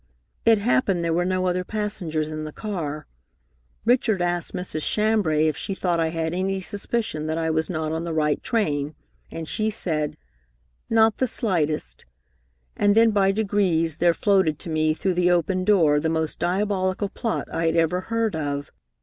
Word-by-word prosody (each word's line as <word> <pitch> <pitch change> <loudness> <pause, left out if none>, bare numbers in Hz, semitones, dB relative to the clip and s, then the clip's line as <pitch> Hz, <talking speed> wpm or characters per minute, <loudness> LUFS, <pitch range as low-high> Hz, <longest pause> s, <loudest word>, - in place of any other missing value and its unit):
It 225 -1 +6
happened 200 -5 +1
there 165 - +1
were 175 +1 +1
no 185 0 0
other 180 0 0
passengers 180 -7 -3
in 155 0 -4
the 155 - -6
car. 155 -7 -4 0.8
Richard 235 -4 +3
asked 175 -1 -1
Mrs. 180 -4 -4
Chambray 205 -7 +2
if 155 -2 +1
she 195 - -4
thought 175 -3 0
I 165 - +2
had 160 0 -2
any 190 +1 -1
suspicion 200 -3 -2
that 160 +1 -1
I 160 -1 0
was 160 0 0
not 160 -3 -2
on 160 +1 -2
the 170 - -4
right 150 -2 +1
train, 150 - -1 0.3
and 165 -1 -6
she 215 +5 0
said, 155 -8 -2 0.7
'Not 225 -1 +4
the 260 - +2
slightest,' 165 -10 -2 0.7
and 205 0 +3
then 225 0 +6
by 195 -2 +3
degrees 190 -6 +1
there 170 0 +3
floated 190 -7 +2
to 165 - -6
me 155 0 +1
through 190 +2 0
the 180 0 +2
open 180 +1 +1
door 165 -7 +4
the 160 - -1
most 160 -1 -2
diabolical 190 +1 0
plot 225 +2 -3
I 165 0 0
had 165 - +1
ever 165 +2 +2
heard 225 -2 -1
of. 145 -2 -3
175 Hz, 175 wpm, -24 LUFS, 160-205 Hz, 0.8 s, It